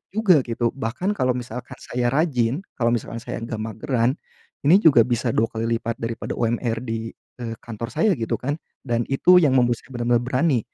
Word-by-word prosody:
juga 190 -9 +5
gitu. 115 0 -1
Bahkan 135 - -2
kalau 130 0 +2
misalkan 125 0 -7
saya 120 0 -2
rajin 140 -1 +1 0.2
kalau 120 0 +3
misalkan 115 0 -5
saya - - -5
enggak 115 -1 -5
mageran. 115 +4 0 0.5
Ini 185 +7 +6
juga 135 -8 +6
bisa 120 0 0
2 110 - +2
kali 115 +1 -1
lipat 115 0 -3
daripada 115 0 -3
UMR 115 0 -1
di, 115 -1 -4 0.3
eee, 115 -2 -4
kantor 115 0 -6
saya 220 - +3
gitu 115 - -2
kan. 145 +4 -2 0.3
Dan 120 -2 -1
itu 180 +7 +5
yang 145 -5 +3
membuat 120 -2 +3
saya - - -18
bener-bener 120 0 +1
berani, 130 +1 +2
120 Hz, 185 wpm, -23 LUFS, 115-135 Hz, 0.5 s, Ini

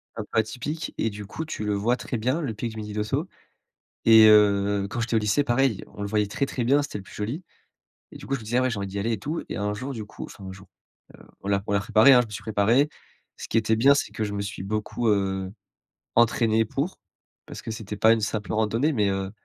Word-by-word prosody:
un - - -4
peu - - -1
atypique 140 +8 -3
et 115 - 0
du 105 -1 -8
coup, 160 +10 -6
tu 155 -8 -5
le 105 - 0
vois 110 +5 +1
très 125 - -4
bien, 130 +9 0
le 135 -8 -3
pic 115 +2 -4
du 110 - -10
midi 105 -1 -6
d'Ossau 110 - -2 0.8
et 110 -1 +8
heu, 100 -1 +4
quand 120 - -4
j'étais 115 0 -1
au - - +4
lycée, 105 +7 +1
pareil, 120 -4 +1
on - - -11
le 100 - -2
voyait 105 0 +1
très 110 +7 -1
très 130 -2 -3
bien, 140 +4 +4
c'était 145 -6 -5
le - - -10
plus - - -14
joli 120 - -4 0.7
et - - -9
du - - -11
coup, 135 - -3
je - - -5
me 110 - -11
disais: 120 +3 0
«Ah - - +4
ouais, 130 - +2
j'ai 115 - -3
envie 100 0 -3
d'y 100 +1 -5
aller 115 +4 -1
et 110 - -3
tout» 155 +9 -4
et - - -4
un 105 0 -1
jour, 130 +6 -5
du 110 -4 -6
coup - - -9
enfin 100 - -13
un 95 - -6
jour, 95 0 -13 0.5
heu, - - -16 0.2
voilà, 100 0 0
on - - -1
l'a 100 - +3
préparé, 110 +6 +6
hein. 125 - +7
Je - - -4
me 105 - -16
suis 105 - -6
préparé. 115 +7 +2 0.5
Ce - - -7
qui - - 0
était 110 0 +2
bien, 135 +6 +6
c'est 140 - -1
que 110 +1 -3
je 105 -1 -3
me 100 - -2
suis 100 -2 -5
beaucoup, 110 +3 -2
heu, 95 -2 0 0.6
entraîné 115 -1 +3
pour. 140 - -3 0.5
Parce - - -9
que - - -6
c'était 110 -1 -6
pas 110 +2 +5
une 115 - +2
simple 105 -2 -3
randonnée, 110 +7 +1
mais, 105 -7 +1
heu, 95 0 -2
110 Hz, 270 wpm, -25 LUFS, 105-120 Hz, 0.8 s, et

